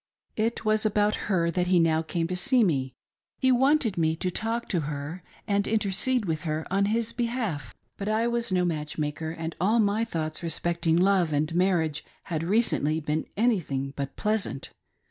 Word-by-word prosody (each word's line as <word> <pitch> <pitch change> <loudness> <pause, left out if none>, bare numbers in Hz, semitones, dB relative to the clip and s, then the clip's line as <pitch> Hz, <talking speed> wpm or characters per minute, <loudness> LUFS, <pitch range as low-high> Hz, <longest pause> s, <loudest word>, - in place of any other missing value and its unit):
It 225 +1 -1
was 215 0 +3
about 210 -1 +2 0.2
her 170 -4 +2
that 180 0 0
he 180 -1 +4
now 160 -1 +3
came 165 +1 -2
to 185 - -2
see 255 +5 +3
me; 135 - 0 0.2
— - - -68
he 260 - +3
wanted 255 - +3
me 160 -1 +2
to 180 +2 -2
talk 225 +5 -2
to 180 - +1
her 150 +3 -5 0.3
and 200 -1 +1
intercede 220 +3 +1
with 160 -3 -2
her 155 -1 -3
in 195 +1 +2
hist 225 +2 -1
behalf. 225 - -2 0.2
But 200 +1 -3
I 220 +2 +1
was 235 -2 -1
no 180 -1 +2
niatchi? 150 -3 -3
maker, 150 +1 -3
and 165 0 -5
all 215 +5 +3
my 210 +1 +2
thoughts 160 -8 -3
respecting 170 0 0
love 185 -2 +3
and 150 +2 0
marriage 170 -4 +1 0.3
ha4 165 0 -2
recently 175 -8 +2
been 155 0 -2
anything 160 - 0
but 140 -1 -4
pleasant. 210 -10 -1
180 Hz, 185 wpm, -27 LUFS, 160-215 Hz, 0.3 s, he